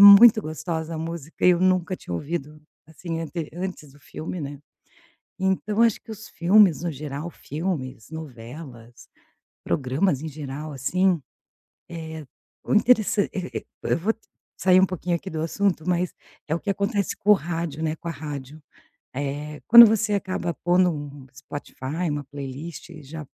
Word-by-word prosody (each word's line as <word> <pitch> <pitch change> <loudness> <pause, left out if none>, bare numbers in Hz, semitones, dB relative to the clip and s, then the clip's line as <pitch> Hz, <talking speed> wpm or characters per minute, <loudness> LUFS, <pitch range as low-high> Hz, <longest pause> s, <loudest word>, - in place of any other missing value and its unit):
muito 205 +2 +10
gostosa 160 0 -4
a - - -4
música 165 -1 -5
e - - +9
eu 175 -1 +3
nunca 185 0 +2
tinha 90 - -9
ouvido, 150 - -4 0.3
assim, 165 +1 -5
ante 165 -1 -4
antes 175 -5 -5
do 145 - -20
filme, 160 +5 -6
né. 145 0 -6 0.8
Então, 190 +3 +1
acho 230 -2 +4
que - - -11
os 220 0 -9
filmes 180 -2 +4
no 175 - -1
geral, 145 +2 -5
filmes, 150 - -4
novelas, 125 -4 -10 0.6
programas 135 +3 +1
em 160 - -4
geral, 150 +1 -6
assim, 175 +6 +1 0.7
eh, 160 -2 -7 0.4
o - - 0
interessan 215 -2 +4
eh 185 -2 -3
eh - - 0
eh, - - -11 0.3
eu - - +3
vou 205 +7 +1
t 225 - -27 0.4
sair 185 0 +5
um 190 - +5
pouquinho 180 -1 -1
aqui 180 - -8
do 160 -1 -3
assunto, 170 0 0
mas 180 0 0 0.3
é 155 - +1
o - - 0
que 205 - -2
acontece 200 +1 0
com 205 - -8
o 210 - +10
rádio, 165 -4 -3
né, 155 -1 0
com 170 - -7
a - - -1
rádio. 150 -2 -7 0.6
Eh, 145 +2 -4
quando 235 +1 +12
você 215 -1 +2
acaba 185 -3 -1
pondo 180 +1 +3
um 145 -2 -7
um - - -18
Spotify, 145 +4 -5
uma 145 -1 -3
playlist 145 +4 -7
já 150 +2 -8
165 Hz, 170 wpm, -24 LUFS, 145-185 Hz, 0.8 s, quando